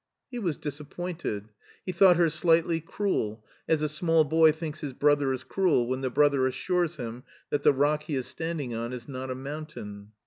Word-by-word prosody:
He 245 - -4
was 175 -9 -1
disappointed. 150 - -5 0.4
He 185 - -2
thought 180 0 +6
her 170 -2 +3
slightly 165 +1 +2
cruel, 115 - -2 0.2
as 155 -1 +2
a - - +2
small 160 +1 +3
boy 160 +2 +5
thinks 155 0 -6
his 145 -4 -5
brother 145 0 +3
is 130 - -3
cruel 180 -11 +2
when 130 +1 -2
the 130 - -1
brother 140 -1 +3
assures 170 +6 -1
him 120 -3 -6 0.3
that 145 - +1
the - - +6
rock 145 +2 +2
he 150 - -2
is 130 -2 -2
standing 160 -7 -3
on 115 +2 -4
is 120 -2 -7
not 130 -1 -6
a 130 - -2
mountain. 130 -8 -8
150 Hz, 195 wpm, -27 LUFS, 130-165 Hz, 0.4 s, thought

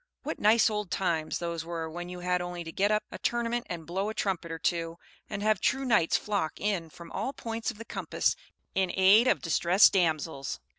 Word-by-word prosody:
What - - -4
nice 220 +2 +5
old 210 -3 -2
times 165 -5 -1
those 170 -1 -3
were 165 -1 -4
when 175 +2 -6
you 180 0 -7
had 180 0 0
only 175 -1 -5
to 165 - -7
get 200 +4 +1
up 215 0 +2
a - - -7
tournament 240 0 -1
and 170 -2 -5
blow 190 +5 -2
a 220 - -5
trumpet 180 -4 -2
or 165 - -3
two, 165 0 -1 0.3
and 205 -1 -4
have 215 -3 +2
true 270 0 +1
knights 210 -10 +3
flock 200 -7 -2
in 195 -6 -1
from 170 +2 -12
all 270 - -3
points 230 -3 -4
of 235 - -6
the 230 - -9
compass - - -1 0.4
in 190 -2 +1
aid 200 +6 +6
of - - +3
distressed 175 +3 +5
damsels! 160 -6 0
180 Hz, 210 wpm, -29 LUFS, 170-210 Hz, 0.4 s, aid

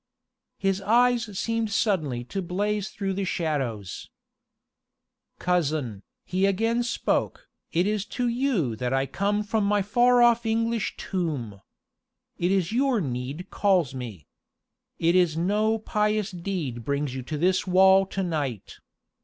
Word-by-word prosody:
His 195 0 0
eyes 235 -1 +2
seemed 230 0 -1
suddenly 155 - 0
to 195 +10 -4
blaze 205 +3 -1
through 195 -2 -3
the 195 +1 -2
shadows. 135 - -3 1.3
"Cousin," 150 - -1 0.2
he 185 +2 +1
again 225 +5 +1
spoke, 240 - -1 0.2
"it 175 +2 +2
is 210 -1 0
to 245 -1 +1
you 235 - 0
that 125 +2 -2
I 135 0 +2
come 205 +7 -1
from 215 0 0
my 205 0 +2
far 240 +4 +4
off 235 0 +4
English 230 0 -1
tomb. 140 - -3 0.8
It 175 - +1
was 190 -2 +1
your 255 0 +2
need 135 +4 -4
called 185 -9 +2
me. 115 - -7 0.7
It 170 +1 +2
is 175 -4 +3
no 210 +6 +1
pious 210 -1 0
deed 170 -10 -4
brings 140 +1 -1
you 130 - -4
to 150 +5 -5
this 185 +4 +1
wall 190 +1 +5
to 195 0 -3
night. 145 - -3
190 Hz, 135 wpm, -26 LUFS, 150-215 Hz, 1.3 s, wall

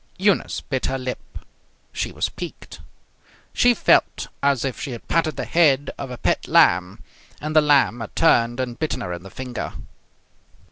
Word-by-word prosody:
Eunice 195 0 +1
bit 130 -3 -3
her 135 - -1
lip. 130 -1 -7 0.6
She - - -3
was - - -1
piqued. - - -9 0.7
She 245 0 +4
felt - - +2
as 140 -2 +1
if 130 - -4
she 135 - -4
had 115 - -10
patted 160 -2 +1
the - - -4
head 145 -5 +3
of 135 - -7
a 125 - -7
pet - - -1
lamb, 90 +1 +3 0.4
and 155 +1 -5
the 155 - +7
lamb 140 -6 +3
had 115 - -8
turned 120 -6 +3
and 125 -2 -4
bitten 155 -1 -2
her 90 - -4
in 85 - -7
the 95 - -11
finger. 125 +3 -6
130 Hz, 175 wpm, -22 LUFS, 120-155 Hz, 0.7 s, the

